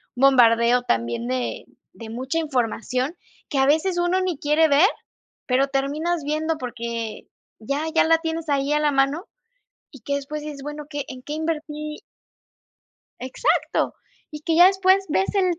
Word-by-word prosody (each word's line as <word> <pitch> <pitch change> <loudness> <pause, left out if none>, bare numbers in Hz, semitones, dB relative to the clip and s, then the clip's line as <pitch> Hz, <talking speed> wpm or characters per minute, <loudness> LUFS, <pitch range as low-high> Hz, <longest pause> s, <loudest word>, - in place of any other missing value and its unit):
bombardeo 245 -2 +5
también 115 - -1
de 125 -3 -2 0.3
de 225 -1 -10
mucha 260 +7 -3
información, 255 0 -1 0.3
que 280 - -2
a 270 - +4
veces 335 +5 +2
uno 355 +2 +1
ni 360 -5 -1
quiere 300 +3 +3
ver, 300 +6 +5 0.6
pero 265 +2 +2
terminas 295 +4 -1
viendo 310 +2 -1
porque 235 -3 -5 0.3
ya 280 +7 -2
ya - - +5
la 325 0 +4
tienes 325 -1 -4
ahí 280 +1 +1
a 300 - +2
la 300 -1 +2
mano, 275 +6 +1 0.7
y 275 - -13
que 280 - -2
después 280 +2 -5
dices: 295 -2 -7
"Bueno, 295 0 -6
¿qué 290 -2 -4
en 255 -1 -9
qué 295 - -6
invertí-?" 305 -1 -4 1.2
Exacto, 260 - 0 0.4
y 300 - -8
que 325 +1 0
ya 350 +2 +9
después 380 0 +3
ves 380 +6 0
el 365 -4 +1
290 Hz, 160 wpm, -23 LUFS, 255-320 Hz, 1.2 s, ya